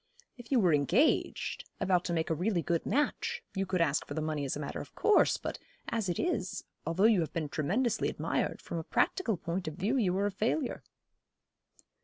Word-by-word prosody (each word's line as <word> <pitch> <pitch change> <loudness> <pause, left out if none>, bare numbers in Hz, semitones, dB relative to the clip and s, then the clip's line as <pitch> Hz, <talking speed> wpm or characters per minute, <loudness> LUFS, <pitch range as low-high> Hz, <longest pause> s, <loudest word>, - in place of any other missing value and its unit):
If 245 0 -13
you 260 - +5
were 180 -6 +4
engaged 175 - +1
about 180 -2 +2
to 175 - -1
make 165 -1 0
a - - +4
really 175 +1 0
good 170 -1 -1
match 460 - 0
you 195 0 -1
could 185 -2 0
ask 155 -3 +2
for 145 - -5
the - - -1
money 155 -2 -2
as 135 - -2
a - - -5
matter 145 - -4
of - - -12
course; 430 - +4
but - - -5 0.3
as 220 -5 -1
it 175 - -1
is, 355 - -1 0.2
although 165 +4 +1
you 220 -3 +6
have 160 - -2
been 155 -3 -2
tremendously 205 - 0
admired, - - -2
from 170 - -4
a - - -5
practical 225 - +1
point 175 +1 -3
of 155 - -4
view 220 +9 0
you 190 -6 +2
are 200 - +1
a 205 - 0
failure.' 235 +7 -1
185 Hz, 210 wpm, -31 LUFS, 160-230 Hz, 0.3 s, you